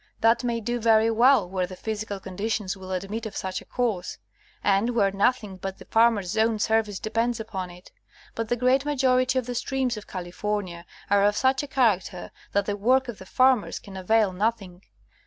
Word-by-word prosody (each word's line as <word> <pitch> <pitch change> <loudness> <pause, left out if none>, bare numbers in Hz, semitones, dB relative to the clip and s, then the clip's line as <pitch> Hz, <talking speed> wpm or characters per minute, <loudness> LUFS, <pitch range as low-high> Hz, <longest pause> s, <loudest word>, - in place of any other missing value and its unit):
That 230 +2 +4
may 235 -1 -1
do 240 +2 -2
very 225 0 +4
well 235 -3 +4
where 185 0 -2
the 185 - -9
physical 215 0 -4
conditions 195 +1 -3
will 190 -1 -9
admit 200 +5 -3
of 215 - -8
such 190 0 -3
a - - -15
course, 220 -8 -2 0.5
and 205 +5 +2
where 200 -4 +3
nothing 205 0 0
but 190 +1 -6
the - - -13
farmers' 225 -5 +2
own 220 0 +2
service 220 -2 +1
depends 230 +3 -1
upon 190 -5 -5
it; 175 +1 -14 0.4
but 225 -1 -4
the 240 - +2
great 255 +2 +2
majority 260 -2 +2
of 255 - 0
the 245 - -4
streams 255 -1 -1
of 210 - -9
California 180 -1 -4 0.2
are 200 0 +5
of 205 +1 +2
such 265 0 +2
a 290 - -6
character 205 -9 0 0.2
that 200 0 +1
the 205 - -1
work 255 +5 +2
of 230 - -7
the 190 - -11
farmers 255 -2 +3
can 195 - -11
avail 200 +1 +2
nothing. 195 -2 -2
220 Hz, 195 wpm, -25 LUFS, 195-240 Hz, 0.5 s, are